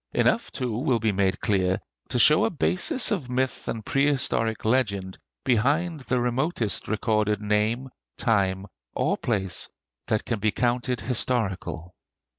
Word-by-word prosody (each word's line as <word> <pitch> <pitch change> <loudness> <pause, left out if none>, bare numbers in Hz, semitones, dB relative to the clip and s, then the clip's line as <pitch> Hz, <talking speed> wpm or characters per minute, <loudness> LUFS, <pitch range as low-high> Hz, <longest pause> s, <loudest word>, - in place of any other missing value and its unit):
Enough - - +2
too 120 -3 -3
will 130 -3 +2
be 110 -1 +1
made 95 -1 0
clear 95 -2 +1 0.3
to 125 - -1
show 150 +6 +6
a - - +2
basis 185 - +2
of 165 -12 -2
myth 130 0 -1
and 110 -2 -4
prehistoric 135 -6 +1
legend 100 -6 0 0.2
behind 145 +7 +1
the 125 -1 -1
remotest 125 - -1
recorded 105 -1 0
name, 105 +5 0 0.3
time, 95 -4 +1 0.3
or - - +1
place 95 -6 -2 0.4
that 110 - 0
can 115 -3 -2
be 110 +1 +2
counted 125 +1 0
historical. 100 -8 -2
115 Hz, 135 wpm, -25 LUFS, 105-130 Hz, 0.4 s, show